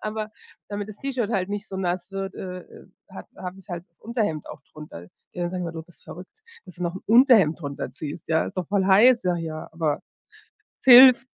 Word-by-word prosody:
Aber 215 0 -5 0.4
damit 205 0 -5
das 210 - -10
T-Shirt 255 -5 -3
halt 195 -3 -1
nicht 205 0 -5
so 190 - -7
nass 180 0 -3
wird, 195 0 -5
äh, 180 -1 -7
ähm, - - -17 0.2
hab - - -11
habe 185 +1 -8
ich 190 - -20
halt 175 -1 -6
das 170 - -29
Unterhemd 215 - -3
auch - - -10
drunter. 150 - -11 0.3
Die - - -10
anderen 175 0 -2
sagen 180 0 -4
immer: 170 - -4
„Du 160 -1 -7
bist 175 - -20
verrückt, 175 - -12 0.3
dass 185 - -13
du 180 - -7
noch 170 - -3
'n - - -10
Unterhemd 225 - +5
drunter 140 -3 -5
ziehst, 155 +1 -8
ja, 160 0 +1
ist - - -9
doch 180 - -3
voll 200 -1 +1
heiß 230 +5 +5
da 180 -1 0
hier!“ 160 -2 -6
Aber 160 -3 -1 0.8
es - - -28
hilft. 255 0 +9
185 Hz, 225 wpm, -24 LUFS, 170-215 Hz, 0.8 s, hilft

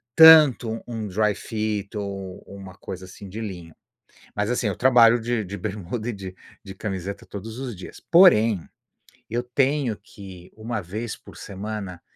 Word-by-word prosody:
tanto 150 -8 +7
um 115 -3 -4
dry-fit, 105 +1 -2
ou 100 -2 -6
uma 95 -2 -11
coisa, 95 0 -8
assim, 95 +2 -11
de 110 +4 -6
linho. 90 -7 -8 0.6
Mas 105 +1 -1
assim, 120 -2 0
eu 100 - -1
trabalho 120 -2 +6
de 115 -1 -1
de 100 +2 -6
bermuda 110 +3 -4
e - - -2
de 95 -2 -8 0.3
de 95 -2 -10
camiseta 95 -1 -5
todos 110 +3 -8
os 125 -4 -5
dias. 90 -1 -11
Porém, 115 - +6 0.7
eu 120 +2 -1
tenho 130 -1 0
que 95 -3 -13
1 110 0 -4
vez 105 +6 -5
por - - -16
semana 100 -2 -6
105 Hz, 155 wpm, -24 LUFS, 95-115 Hz, 0.7 s, tanto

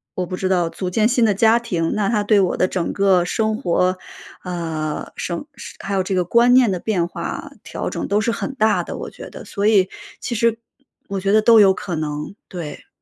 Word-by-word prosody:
我 180 - -1
不 185 - -5
知 185 0 -2
道， 180 -3 +2
组 180 +2 -4
建 215 +4 +2
新 240 -1 +3
的 210 - +3
家 225 +3 +4
庭。 175 -9 -2
那 205 -2 0
它 210 -3 +1
对 205 0 +4
我 185 -2 +1
的 185 - +2
整 180 -2 -2
个 195 -3 +3
生 220 +4 0
活， 185 -5 +1 0.5
呃， 165 -4 -4
生 170 +8 -4 0.3
还 200 - -4
有 195 - +2
这 190 +1 -2
个 180 -1 +1
观 235 +6 +4
念 250 -4 +5
的 185 - -2
变 180 -4 0
化， - - -6
调 - - -4
整 - - -4
都 205 - +2
是 230 - 0
很 270 +4 -4
大 215 -7 +2
的， - - -7
我 - - -6
觉 - - -10
得。 - - -10
所 205 0 -1
以 195 -4 +4 0.3
其 - - -4
实 230 +1 +2 0.5
我 200 -1 -3
觉 195 +1 0
得 215 +1 +5
都 230 0 +6
有 195 -2 +6
可 185 -2 -5
能， 150 +1 -4
对。 170 -5 -8
195 Hz, 240 characters per minute, -20 LUFS, 180-220 Hz, 0.5 s, 都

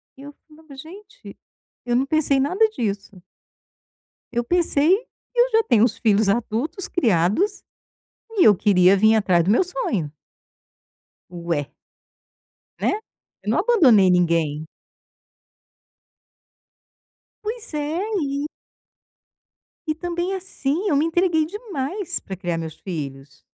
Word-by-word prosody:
Eu 285 +2 -11
falava: 310 -2 -16
"Gente, 390 - -12 0.5
eu 240 -1 0
não 260 +2 +2
pensei 290 -2 +1
em - - +2
nada 370 +11 +2
disso". 200 - -5 1.1
Eu 240 0 -1
pensei 335 +3 +3 0.4
que - - -2
eu - - +5
já 450 0 +3
tenho 230 - +3
os 235 -2 +1
filhos 215 -2 +2
adultos, 240 - -2
criados 230 - +1 0.7
e 405 -5 +3
eu 210 - +7
queria 185 0 +4
vim 220 +3 +4
atrás 185 -6 +2
do 190 - +1
meu 230 - +4
sonho. 220 - -3 1.2
Ué. 170 -5 -3 1.1
Né. - - +1 0.5
Eu - - -4
não - - +1
abandonei 265 - +5
ninguém. 165 -4 +1 2.8
Pois 445 -2 -5
é, 300 +3 -2 0.2
e 280 +1 -2 1.4
E 310 - 0
também, 350 +2 -3
assim, 365 -1 -3
eu 300 - +2
me 290 +3 +2
entreguei 330 -1 +1
demais 370 - -5
para 190 - -8
criar 175 -2 -3
meus 160 -1 -6
filhos, 140 -6 -8
275 Hz, 120 wpm, -22 LUFS, -, 2.8 s, eu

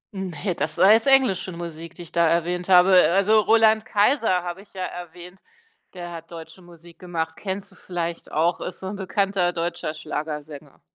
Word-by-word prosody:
Ne, 185 0 -3
das 155 0 -3
war 195 - +6
jetzt 225 +4 +2
englische 255 -9 +3
Musik, 170 -1 -8
die 175 - -9
ich 165 - -14
da 170 -1 +2
erwähnt 175 +2 -1
habe. 180 +1 +6 0.2
Also, 205 +3 +4
Roland 220 0 +4
Kaiser 210 -4 +1
habe 175 +2 -6
ich 200 - -20
ja 185 -1 -5
erwähnt, 180 +1 -9 0.6
der 175 -1 -7
hat 165 -1 -10
deutsche 165 +2 -11
Musik 170 -1 -17
gemacht. 165 -3 -4
Kennst 190 0 -5
du - - -17
vielleicht 170 -2 -5
auch, 165 +3 0
ist 180 - -6
so 190 - -9
'n 205 - -5
bekannter 195 -2 0
deutscher 170 -2 -3
Schlagersänger. 150 -1 -7
175 Hz, 180 wpm, -23 LUFS, 170-195 Hz, 0.6 s, war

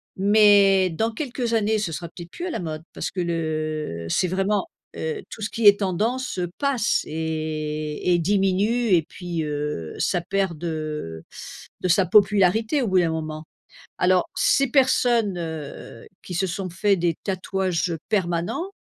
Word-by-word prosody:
mais 200 -1 +5
dans 225 +8 -1
quelques 245 -1 -3
années, 220 -1 +2
ce 190 -5 -2
sera 170 +2 -5
peut-être 170 +1 -11
plus 355 - -6
à - - -3
la - - -3
mode, 155 -2 -5
parce - - -4
que 190 - -5
le 155 - -2
c'est 180 - +1
vraiment, 195 - 0 0.3
heu, 460 -3 -3
tout - - -9
ce 210 - -2
qui 225 -2 +2
est 205 0 +8
tendance, 215 +6 -1
heu, 175 -1 -2
passe 265 -5 +1
et 155 0 -2
et 175 - +3
diminue, 200 +6 +1
et 170 - +5
puis, 175 -3 -4
heu, 145 - -4
ça 175 - +1
perd 190 -2 -1
de 155 - -5 0.6
de 185 - 0
sa 180 +2 +4
popularité 210 - +3
au 235 - 0
bout 185 -1 +3
d'un 170 - +2
moment. 155 -1 -4 0.6
Alors 180 0 +3
ces 275 - +3
personnes, 240 -7 +3
heu, 160 -8 -7 0.2
qui 180 - -7
se 190 +3 +1
sont 185 +1 -4
fait 195 +3 +2
des 170 -2 0
tatouages, 190 -2 -1
heu, 165 - -3
permanents 185 - -1
185 Hz, 165 wpm, -23 LUFS, 160-210 Hz, 0.6 s, est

